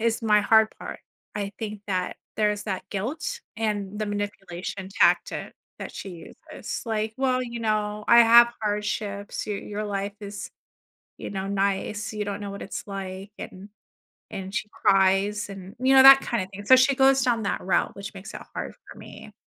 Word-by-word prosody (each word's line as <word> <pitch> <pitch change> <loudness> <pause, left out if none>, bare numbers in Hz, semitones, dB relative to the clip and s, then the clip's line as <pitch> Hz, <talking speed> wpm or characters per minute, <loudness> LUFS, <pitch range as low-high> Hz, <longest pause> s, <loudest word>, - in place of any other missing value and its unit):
is 230 +1 0
my 210 -2 +4
hard 220 +1 +5
part. - - -7 0.3
I 205 -1 -3
think 210 -2 -5
that 185 -2 -2 0.2
there's 210 -1 +1
that 190 -3 -3
guilt 290 - -3 0.2
and 210 -2 -2
the 215 - -2
manipulation 195 -2 -5
tactic - - +2 0.3
that - - -7
she 195 - -7 0.4
uses. - - -5
Like, 220 -1 -2
"Well, 255 -1 +1
you 235 -1 -6
know, 210 -1 -1
I 235 - +7
have 235 +1 +8
hardships. 210 -1 -3
Your 205 -2 -2
your 210 +1 -5
life 200 -1 -3
is, 205 0 -7 0.7
you - - -6
know, 195 -1 -3
nice. 200 +2 -1
You 210 -1 -3
don't 200 0 -4
know 200 - -5
what 200 - -8
it's - - -6
like." 195 0 -6
And 195 +2 -9 0.6
and 190 0 -6
she 215 -1 -2
cries 195 +2 +2
and, 195 0 -10
you 260 +2 +3
know, 265 - +9
that 270 0 +10
kinda 215 -8 -2
thing. 205 +1 -8
So 260 - +8
she 260 +1 +4
goes 270 0 +5
down 235 -4 +1
that - - -1
route, 185 - 0
which 200 +1 -7
makes 195 +2 -10
it - - -6 0.2
hard - - -4 0.2
for - - -12
me. - - -12
210 Hz, 180 wpm, -25 LUFS, 195-225 Hz, 0.7 s, that